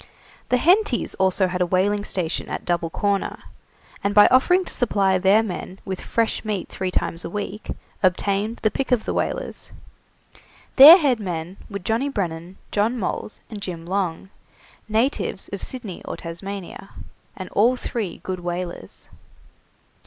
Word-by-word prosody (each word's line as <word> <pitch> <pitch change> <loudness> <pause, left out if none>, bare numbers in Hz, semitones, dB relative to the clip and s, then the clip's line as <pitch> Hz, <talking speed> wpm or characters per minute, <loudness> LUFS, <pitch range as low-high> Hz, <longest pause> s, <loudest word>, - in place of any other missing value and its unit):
The 250 - +3
Hentys 350 - +2
also 190 0 +3
had 180 0 -2
a - - +4
whaling 200 +3 +1
station 180 -5 -3
at - - -5
Double 170 -2 0
Corner, 200 +3 -1 0.6
and 200 +1 0
by 205 - +9
offering 355 +9 +4
to - - -2
supply 195 -5 +2
their 195 +4 +4
men 190 -2 -6
with 190 -1 -4
fresh 230 -1 -1
meat 210 -4 -3
three 190 -1 -3
times 170 -1 -2
a - - -5
week, 205 +2 -5 0.3
obtained 200 +4 +1
the 215 - +3
pick 270 - -3
of 245 -3 +2
the - - -2
whalers. - - -3 1.1
Their 300 +6 +12
head 275 - +1
men 180 -2 -5
were 200 - -4
Johnny 225 +8 -1
Brennan, 180 -6 -4
John 220 +4 +1
Moles, 210 0 -4
and 210 -2 -7
Jim 170 -4 -5
Long, 190 0 -2 0.6
natives 220 -3 0
of 200 - -6
Sydney 235 -8 -6
or - - -6
Tasmania, 195 +3 -7 0.5
and 185 - -6
all 235 +5 +3
three 220 -7 -4
good 185 -1 -4
whalers. 175 - -6
200 Hz, 150 wpm, -23 LUFS, 180-225 Hz, 1.1 s, Their